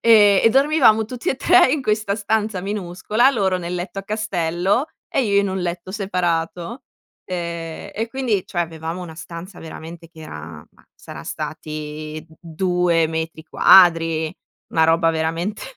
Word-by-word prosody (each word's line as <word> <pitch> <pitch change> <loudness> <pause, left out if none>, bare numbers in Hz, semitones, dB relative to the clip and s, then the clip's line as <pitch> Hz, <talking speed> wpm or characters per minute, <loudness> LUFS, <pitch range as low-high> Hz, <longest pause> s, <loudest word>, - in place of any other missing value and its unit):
Ehm, 210 -4 +6
e 225 - +8
dormivamo 270 -5 +4
tutti 245 +1 -5
e - - 0
3 350 -3 +5
in 300 - 0
questa 210 -3 0
stanza 215 -2 -1
minuscola, 205 +4 0
loro 195 -7 0
nel 175 0 -4
letto 180 +2 -5
a - - -17
castello 195 - 0 0.2
e 270 - 0
io 200 -1 +3
in 200 - -1
un 190 - -2
letto 175 +1 -4
separato. 180 +2 -2 0.5
Ehm, 170 -2 -5
e 225 +2 -2
quindi, 235 -6 -1
cioè 175 -4 -1
avevamo 165 +2 -6
una 165 -3 -9
stanza 170 +3 -9
veramente 165 +1 -10
che 165 0 -19
era, 80 - -9
ma - - -26
saran - - -10
stati 155 0 -6 0.2
2 175 0 +1
metri 160 0 -4
quadri, 165 -1 +5 0.4
una 160 - +3
roba 165 0 +3
veramente 165 +5 -2
180 Hz, 150 wpm, -21 LUFS, 165-210 Hz, 0.5 s, e